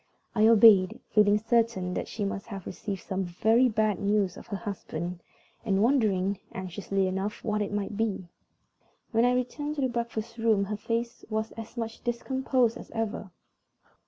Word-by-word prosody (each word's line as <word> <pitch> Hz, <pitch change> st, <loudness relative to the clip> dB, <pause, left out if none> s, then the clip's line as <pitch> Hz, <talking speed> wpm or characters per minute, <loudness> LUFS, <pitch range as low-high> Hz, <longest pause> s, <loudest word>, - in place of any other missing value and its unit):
I 215 Hz, -1 st, +4 dB
obeyed, 210 Hz, -4 st, +7 dB
feeling 210 Hz, -1 st, +5 dB
certain 225 Hz, -4 st, +1 dB
that -, -, -3 dB
she 210 Hz, -, -3 dB
must 195 Hz, 0 st, -4 dB
have 195 Hz, -5 st, -7 dB
received 195 Hz, 0 st, -5 dB
some 190 Hz, 0 st, -2 dB
very 220 Hz, +8 st, +3 dB
bad 215 Hz, -2 st, +1 dB
news 200 Hz, -2 st, +1 dB
of -, -, -12 dB
her 200 Hz, -, -3 dB
husband, 180 Hz, -4 st, -5 dB, 0.4 s
and 200 Hz, -3 st, +2 dB
wondering, 205 Hz, -7 st, +2 dB
anxiously 190 Hz, +1 st, -2 dB
enough, 190 Hz, +3 st, -3 dB
what 215 Hz, -1 st, 0 dB
it 205 Hz, -, -2 dB
might 205 Hz, 0 st, -2 dB
be. 205 Hz, -4 st, -1 dB, 0.8 s
When 230 Hz, 0 st, +3 dB
I 250 Hz, 0 st, +3 dB
returned 290 Hz, +4 st, -2 dB
to 285 Hz, -, -2 dB
the 260 Hz, -, +2 dB
breakfast 235 Hz, -1 st, -4 dB
room 220 Hz, -3 st, +3 dB
her 210 Hz, +2 st, -3 dB
face 230 Hz, +2 st, -3 dB
was 220 Hz, 0 st, -2 dB
as 225 Hz, +2 st, -9 dB
much 225 Hz, -1 st, -5 dB
discomposed 250 Hz, 0 st, 0 dB
as -, -, -11 dB
ever. 220 Hz, -3 st, -3 dB
215 Hz, 165 wpm, -28 LUFS, 195-230 Hz, 0.8 s, obeyed